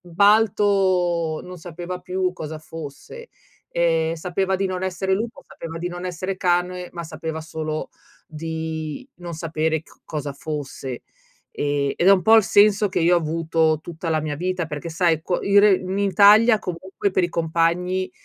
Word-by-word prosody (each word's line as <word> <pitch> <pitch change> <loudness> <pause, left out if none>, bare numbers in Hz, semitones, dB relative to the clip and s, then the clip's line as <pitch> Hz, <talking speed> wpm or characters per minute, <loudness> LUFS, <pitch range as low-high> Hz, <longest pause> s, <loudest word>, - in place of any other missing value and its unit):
"Balto 185 -3 +2
non 180 -1 -9
sapeva 175 +2 -6
più 185 0 -1
cosa 155 -3 -7
fosse, 160 - -10 0.4
ehm, 165 -1 +1
sapeva 190 +3 -1
di 195 - 0
non 185 -1 -4
essere 190 +1 -1
lupo, 230 +6 -4
sapeva 165 0 -8
di 175 +1 -3
non 175 +1 -7
essere 185 +2 -4
cane, 180 0 0
ma 170 - -6
sapeva 160 0 -5
solo 155 -1 -4 0.4
di 160 - -5
non 175 -1 -7
sapere 160 -1 -1
c - - -22
cosa 145 -2 -4
fosse." 140 -3 -6 0.5
Ehm 145 -1 0
ed 180 - +3
è - - +9
un 190 -2 +3
po' 220 - +6
il 220 - +6
senso 205 +1 +4
che 185 - -2
io 170 +2 +4
ho - - +4
avuto 160 0 +1
tutta 165 0 -6
la 155 -1 +1
mia 150 -1 -3
vita, 180 0 -2
perché, 150 +1 -6
sai, 165 -1 +1
co 175 +1 -1
ire 200 0 +5
in 185 +2 -3
Italia, 210 +3 +6
comunque, 190 +2 -3
per 185 - +2
i - - -1
compagni, 170 +3 0
175 Hz, 170 wpm, -22 LUFS, 160-190 Hz, 0.5 s, è